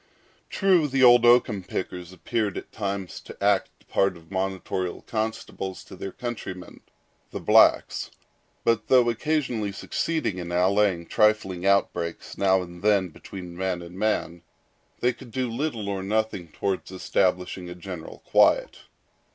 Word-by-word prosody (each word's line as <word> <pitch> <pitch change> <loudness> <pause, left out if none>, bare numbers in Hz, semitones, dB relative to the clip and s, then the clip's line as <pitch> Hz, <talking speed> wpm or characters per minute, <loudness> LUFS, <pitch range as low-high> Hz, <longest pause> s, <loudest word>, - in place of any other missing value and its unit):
True, 185 -6 +3
the 135 -1 +1
old 120 -1 +8
oakum 120 -4 +4
pickers 90 -1 -5
appeared 105 +2 -2
at - - -8
times 100 -3 -4
to - - -12
act - - +2
the - - -28
part 95 -2 +1
of 80 +2 -19
monitorial 95 -1 -3
constables 110 -4 -4
to - - -12
their 95 - -6
countrymen, 100 -7 -7 0.5
the - - -5
blacks; - - +4 0.5
but 115 -2 +1
though 125 -2 +5
occasionally 120 -5 -1
succeeding 110 - -2
in 85 -1 -5
allaying 95 0 +2
trifling 100 -3 +2
outbreaks 85 -4 0
now 95 -1 +3
and 85 0 -11
then 100 -3 +3
between 90 +1 -9
man 90 -1 -2
and 85 +1 -11
man, 95 -4 -1 0.6
they 125 0 +3
could 120 - -13
do 130 +2 -2
little 115 -4 -3
or 100 -1 -2
nothing 105 -3 -1
toward 95 +4 -3
establishing 90 -1 -1
general 90 -3 -8
quiet. - - +3
100 Hz, 140 wpm, -25 LUFS, 90-115 Hz, 0.6 s, old